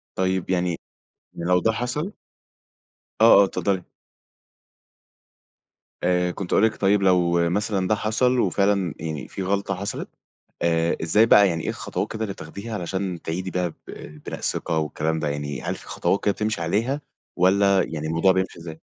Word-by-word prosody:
طيب 95 -1 0
يعني 90 -2 0 0.6
م 85 - -6
لو 90 0 +5
ده 110 - +2
حصل 125 - -3 1.1
آه، 110 -3 +8
آه - - +7
اتفضلي. 95 -1 -1 2.2
آآ، 90 0 +2
كنت 90 0 -5
هاقول 105 - +5
لِك 110 - 0
طيب 100 +1 +2
لو 85 -2 +3
مثلًا 100 0 0
ده 110 - +3
حصل 125 +4 +1
وفعلاً 100 -3 +1
يعني 75 -4 -5
في 95 - -5
غلطة 100 +1 -1
حصلت 100 +2 -5 0.5
آآ، 85 0 +1
إزاي 105 +8 +4
بقى 105 -3 +7
يعني 85 -2 -2
إيه - - -2
الخطوات - - -3
كده 110 - -6
اللي 100 -3 -3
بتاخديها 100 +7 -8
علشان 95 -2 -3
تعيدي 90 +3 -4
بيها 90 -1 0
ب 80 - -9 0.5
بناء - - -5
الثقة 80 - -1
والكلام 80 +1 -1
ده 75 - -2
يعني، 70 -1 -4
هل - - -3
في - - -13
خطوات 100 - 0
كده 100 - +3
بتمشي 110 -3 -2
عليها 115 - 0 0.3
والّا 100 +1 +4
يعني 80 -1 -4
الموضوع 85 +4 +3
بيمشي 95 -2 -1
إزاي؟ 80 -1 -9
95 Hz, 165 wpm, -24 LUFS, 85-100 Hz, 2.2 s, آه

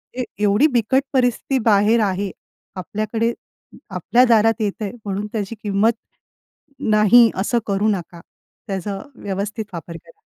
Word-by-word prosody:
ते 255 - -2 0.2
एवढी 210 +8 +4
बिकट 245 +3 +2
परिस्थिती 255 +1 +1
बाहेर 215 +1 +4
आहे. 195 0 -1 0.4
आपल्याकडे 215 +5 -2 0.6
आपल्या 245 +1 +2
दारात 225 -1 +3
येतंय 205 0 -2
म्हणून 200 +1 -3
त्याची 215 0 -3
किंमत 205 +2 +2 0.9
नाही, 215 +2 +5
असं 225 +5 0
करू 200 +1 +1
नका. 175 -4 -4 0.5
त्याचा 195 0 -4 0.2
व्यवस्थित 205 +2 -4
वापर 170 0 -7
करा. 165 +1 -20
210 Hz, 120 wpm, -20 LUFS, 195-230 Hz, 0.9 s, नाही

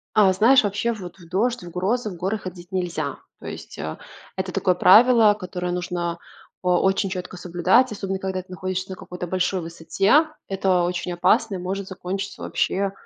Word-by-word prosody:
А, 200 -3 +6
знаешь, 230 +8 +5
вообще 205 +3 0
вот 185 -4 -9
в 175 -3 -15
дождь, 230 +5 0
в 175 - -8
грозы, 210 +6 -1
в 185 - -8
горы 190 +5 -1
ходить 180 -3 -9
нельзя. 170 -6 -2 0.2
То - - -10
есть, - - -8
э, 80 +2 -5 0.4
это - - -3
такое 185 - +2
правило, 220 +3 +6
которое 180 -1 -4
нужно 175 -1 -2 0.4
о 180 -1 +2
очень 195 +1 +1
четко 185 -1 -6
соблюдать, 180 +8 +2
особенно 195 -2 -3
когда 190 -1 -3
ты 185 - -23
находишься 185 +1 -3
на 190 - -5
какой-то 180 0 -7
большой 185 +1 0
высоте. 170 - +2 0.2
Это 190 -2 +2
очень 175 0 -2
опасно 215 +4 +2
и - - -3
может 190 +2 -4
закончиться 190 +1 -5
вообще, 195 0 0
185 Hz, 180 wpm, -23 LUFS, 180-200 Hz, 0.4 s, А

